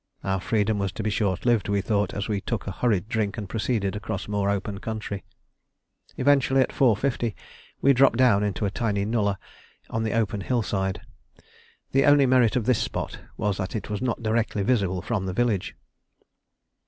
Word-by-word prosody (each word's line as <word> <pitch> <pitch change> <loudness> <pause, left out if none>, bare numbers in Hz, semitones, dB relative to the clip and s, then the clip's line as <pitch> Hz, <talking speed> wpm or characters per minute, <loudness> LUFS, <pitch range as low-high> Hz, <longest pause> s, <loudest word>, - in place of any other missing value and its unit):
Our 95 -1 -1
freedom 105 +1 +1
was 100 -1 -1
to 110 - -5
be 105 - 0
short 100 -2 -1
lived, 120 -4 +2
we 100 0 +2
thought, 105 +1 0
as 100 - -3
we 105 -3 -1
took 115 +1 -3
a 100 - -3
hurried 105 -2 0
drink 110 -3 -1
and 105 -3 -4
proceeded 105 -1 -1
across 100 -1 -4
more 100 -1 0
open 100 0 -2
country. 110 -3 -5 0.9
Eventually, 135 -1 +3
at - - +1
4.50, 120 -2 +1 0.5
we 140 - +6
dropped 130 -2 +4
down 125 -6 +4
into 105 0 -1
a 100 - -1
tiny 100 -3 -1
nullah 105 -3 0 0.5
on 115 - -1
the 110 -1 -1
open 105 -3 0
hillside. 100 -5 -1 0.9
The 135 +1 +3
only 145 -1 +6
merit 125 -4 +4
of 120 -4 0
this 125 -2 +2
spot - - -4 0.2
was 105 -2 -1
that 95 +1 -4
it 105 0 -4
was 105 - -3
not 120 -3 -2
directly 110 -2 0
visible 95 -5 +1
from 105 -5 -2
the 95 - -2
village. 110 -3 0
105 Hz, 180 wpm, -25 LUFS, 100-120 Hz, 0.9 s, we